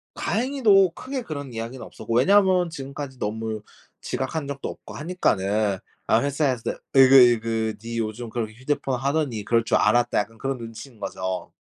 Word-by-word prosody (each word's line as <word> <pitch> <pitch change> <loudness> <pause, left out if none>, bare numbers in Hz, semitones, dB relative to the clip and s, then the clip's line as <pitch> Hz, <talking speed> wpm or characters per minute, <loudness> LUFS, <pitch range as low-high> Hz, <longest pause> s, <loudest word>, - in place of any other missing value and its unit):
다행히도 225 -7 +3
크게 260 +8 -5
그런 145 - -6
이야기는 115 +1 -6
없었고 - - -6
왜냐면 185 +5 +4
지금까지 140 -3 -7
너무 110 0 -3 0.4
지각한 140 +2 -3
적도 140 -1 -5
없고 - - -10
하니까는 105 - 0 0.3
아 110 - +4
회사에서 140 -4 0 0.2
'으이그 135 0 +8
으이그 115 -3 +4
니 115 0 -5
요즘 115 +2 -4
그렇게 110 -1 -4
휴대폰 130 0 -2
하더니 140 -6 -1
그럴 115 -1 +2
줄 - - +2
알았다.' 120 +3 +3
약간 110 +2 -4
그런 135 +2 -2
눈치인 115 0 -10
거죠. 95 -2 -4
125 Hz, 375 characters per minute, -24 LUFS, 110-145 Hz, 0.4 s, 으이그